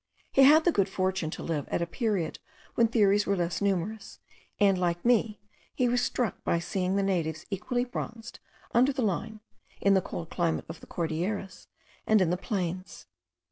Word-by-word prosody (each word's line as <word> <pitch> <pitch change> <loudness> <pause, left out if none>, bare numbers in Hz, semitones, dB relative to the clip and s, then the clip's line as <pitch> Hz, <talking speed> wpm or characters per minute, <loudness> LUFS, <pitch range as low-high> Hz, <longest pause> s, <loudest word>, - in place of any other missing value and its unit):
He 270 - +4
had 300 +4 +7
the 350 - +5
good 200 - +1
fortune 185 -3 -1
to - - -6
live 155 -4 -2
at - - 0
a - - 0
period 195 -3 -2 0.3
when 235 - +4
theories 205 -3 +3
were 200 - +2
less 175 0 -2
numerous; 200 +2 -2 0.4
and, 200 -2 +5
like 175 +1 -1
me, 230 -3 +2 0.4
he 250 - +2
was 245 0 +2
struck 245 -4 -2
by - - +1
seeing 180 +2 -1
the 200 - +2
natives 165 -5 -1
equally 245 +6 -1
bronzed 235 -1 -7 0.3
under 250 +4 +4
the 265 -2 -2
Line, 215 +2 -2 0.4
in 200 - +4
the 190 - +4
cold 165 -1 -7
climate 170 -2 0
of 165 0 -8
the - - -14
Cordilleras, 175 +4 -3 0.4
and 215 -1 +5
in 180 -3 +2
the - - +2
plains. 185 -1 -4
195 Hz, 180 wpm, -28 LUFS, 175-225 Hz, 0.4 s, had